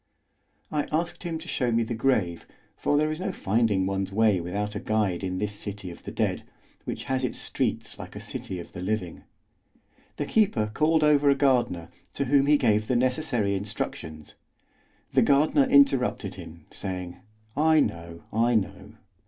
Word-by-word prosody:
I 150 -1 -1
asked 170 +3 -1
him 170 -2 -3
to 160 +2 -10
show 125 -7 0
me 115 0 +2
the 115 - -4
grave, 110 -8 0 0.3
for 145 - +1
there 155 +1 +2
is 155 - -4
no 190 +1 -2
finding 105 - +1
one's 95 0 -2
way 105 -3 +3
without 100 +4 -3
a 105 - -3
guide 105 -5 0
in 95 -1 -2
this 105 +2 -2
city 100 -2 -6
of 85 - -12
the - - -7
dead, - - -1 0.4
which - - -4
has 130 0 -1
its 125 - -1
streets - - -2
like - - -9
a - - -5
city 95 - -5
of 85 - -9
the 90 - -7
living. 95 -3 -3 0.9
The - - -1
keeper 120 - +2
called 155 +3 +3
over 145 -1 +5
a 140 - +5
gardener, 125 - +1 0.3
to 140 - 0
whom 140 +1 +3
he 150 0 +6
gave 110 -5 +2
the 125 - +1
necessary 125 -4 +1
instructions; 95 -6 -5 0.8
the - - +5
gardener 150 - +4
interrupted 275 - +3
him, 80 -1 -11
saying: 90 -2 -3 0.4
"I 155 +2 +4
know, 85 - -2
I 115 +2 +3
know. 105 -3 -2
115 Hz, 175 wpm, -26 LUFS, 95-145 Hz, 0.9 s, he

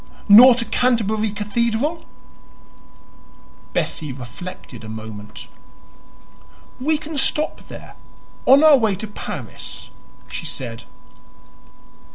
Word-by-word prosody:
"Nor 235 +4 +9
to 235 -1 -2
Canterbury 220 -2 +1
Cathedral?" 230 +9 -2 1.7
Bessie 150 -3 -2
reflected 125 - -9
a 110 - -9
moment. 110 -1 -9 1.3
"We 305 +4 +1
can 305 -1 -5
stop 300 +3 -1
there - - -11 0.5
on 275 +3 +7
our 300 -3 +7
way 220 -4 +1
to 200 - -5
Paris," 205 - -8 0.4
she - - -6
said. 120 -2 -6
220 Hz, 95 wpm, -21 LUFS, -, 1.7 s, Nor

